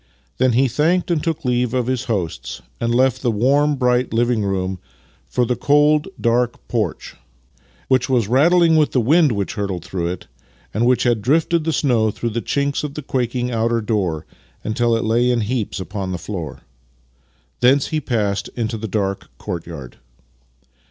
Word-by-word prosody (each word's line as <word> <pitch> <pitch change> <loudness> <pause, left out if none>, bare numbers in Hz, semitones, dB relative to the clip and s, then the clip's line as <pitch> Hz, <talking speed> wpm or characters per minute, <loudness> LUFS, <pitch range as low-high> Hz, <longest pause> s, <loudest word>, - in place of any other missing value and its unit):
Then 130 -1 +3
he 130 +3 +4
thanked 165 +8 +1
and 160 -3 0
took 165 -2 -2
leave 125 0 +1
of 125 -2 +1
his 130 -1 -1
hosts, 90 -8 -3 0.2
and 115 0 0
left 130 0 +2
the 125 - +1
warm, 140 +7 +2
bright 125 -1 +1
living 120 -1 +1
room 95 -1 -2 0.5
for 125 - +1
the 125 - 0
cold, 150 +5 +3
dark 120 0 0
porch, - - -2 0.7
which 130 -1 +2
was 120 -6 +2
rattling 165 +6 +4
with 155 -1 +2
the 130 - +3
wind 150 +5 +4
which 100 -3 -2
hurtled 100 -6 -3
through 85 -3 -3
it 90 +1 -5 0.5
and 115 +3 +1
which 125 -1 +3
had 120 -3 +2
drifted 160 +6 +2
the 165 - +1
snow 120 -8 +2
through 115 +2 -3
the 115 +2 -2
chinks 140 +3 -1
of 145 -1 -5
the 150 - -5
quaking 125 -1 -1
outer 115 0 +1
door 100 -8 -1 0.4
until 115 +1 +1
it - - -2
lay 120 +3 +2
in 120 -2 +2
heaps 110 -1 -2
upon 95 0 -4
the 90 - -2
floor. 85 -3 -6 1.0
Thence 130 +3 +4
he 155 -1 -1
passed 105 -6 -1
into 115 -2 -2
the 110 - -4
dark 100 -1 -2
courtyard. 80 -7 -7
120 Hz, 170 wpm, -20 LUFS, 105-135 Hz, 1.0 s, he